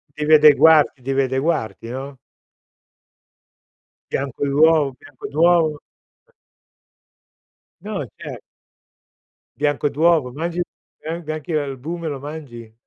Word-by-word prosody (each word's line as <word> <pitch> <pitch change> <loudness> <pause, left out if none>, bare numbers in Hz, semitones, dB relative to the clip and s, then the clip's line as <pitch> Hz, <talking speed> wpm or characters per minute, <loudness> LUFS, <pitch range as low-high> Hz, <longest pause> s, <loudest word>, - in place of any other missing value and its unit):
Devi 150 +1 +1
adeguarti 150 -1 +6
devi 135 +2 0
adeguarti, 130 -3 -2
no? 135 +2 -7 1.9
Bianco 140 0 -2
d'uovo 145 -1 +3
bianco 145 -3 -10
d'uovo. 165 0 +3 0.5
Eh. 480 - -31 1.5
No, - - -4
cer - - -7 1.2
Bianco 145 0 0
d'uovo, 155 -3 +2
mangi 170 +5 -3 0.4
an 165 +2 -4
anche 155 +2 -4
l'albume 150 +4 -3
lo 145 -3 -4
mangi? 135 -6 -9
150 Hz, 95 wpm, -21 LUFS, 135-160 Hz, 1.9 s, adeguarti